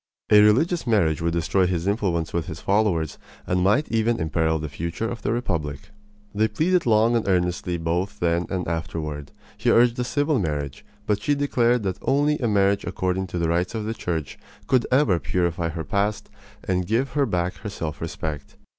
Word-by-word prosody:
A 105 0 +8
religious 140 +11 +3
marriage 85 -10 +2
would 85 0 0
destroy 90 +3 +2
his 90 -2 -1
influence 95 -6 0
with 85 -2 -1
his - - -6
followers 95 -7 0 0.3
and 90 0 0
might 105 +11 +3
even 115 +1 +1
imperil 80 0 +1
the 75 0 -4
future 85 +8 -4
of 115 0 -5
the - - -1
republic. 80 - -3 0.4
They 110 +1 +2
pleaded 165 - +1
long 115 +1 +4
and 115 - 0
earnestly 90 -1 0
both 90 +5 -2
then 85 0 +1
and 95 -2 -2
afterward. 75 -3 -4 0.3
He 120 - +1
urged 120 +1 +4
a - - +1
civil 145 +2 +1
marriage, 75 -6 -3 0.2
but 105 -1 0
she 145 +6 +1
declared 125 -4 +2
that 95 -2 -2
only 145 +2 +2
a 120 - 0
marriage 100 -1 +2
according 95 +1 -2
to 90 - -5
the 85 -1 0
rites 90 +5 0
of 110 -1 -3
the 110 - -2
Church 85 -9 -4 0.3
could 130 -2 +2
ever 130 - +3
purify 85 +2 -1
her 80 0 -4
past 100 +5 -1 0.3
and 90 -1 -1
give 120 +6 0
her 140 -2 +1
back 90 +1 -1
her 105 - -6
self 80 -7 -5
respect. 80 -3 -5
95 Hz, 190 wpm, -24 LUFS, 85-115 Hz, 0.4 s, A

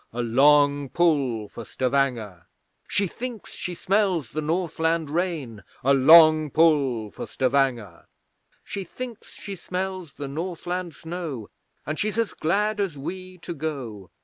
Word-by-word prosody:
(A 120 +1 -2
long 145 +3 +4
pull 140 -11 +1
for 115 - -9
Stavanger!) 120 -9 -1 0.4
She 200 - +1
thinks 235 +3 -6
she 180 - -5
smells 185 - +1
the 155 - -2
Northland 160 -1 0
rain! 155 - -2 0.2
(A 140 +2 +4
long 155 +2 +7
pull 140 -9 +2
for - - -7
Stavanger!) 125 -5 0 0.6
She 200 - -5
thinks 235 +4 -8
she 200 -1 -8
smells 185 -3 -4
the 145 - -5
Northland 175 +2 -4
snow, 160 - -6 0.3
And 155 +2 -3
she's 215 +1 -1
as 230 -2 0
glad 210 +6 0
as 190 -7 -1
we 185 +5 -7
to 175 - -4
go. 135 - -5
155 Hz, 135 wpm, -25 LUFS, 135-180 Hz, 0.6 s, long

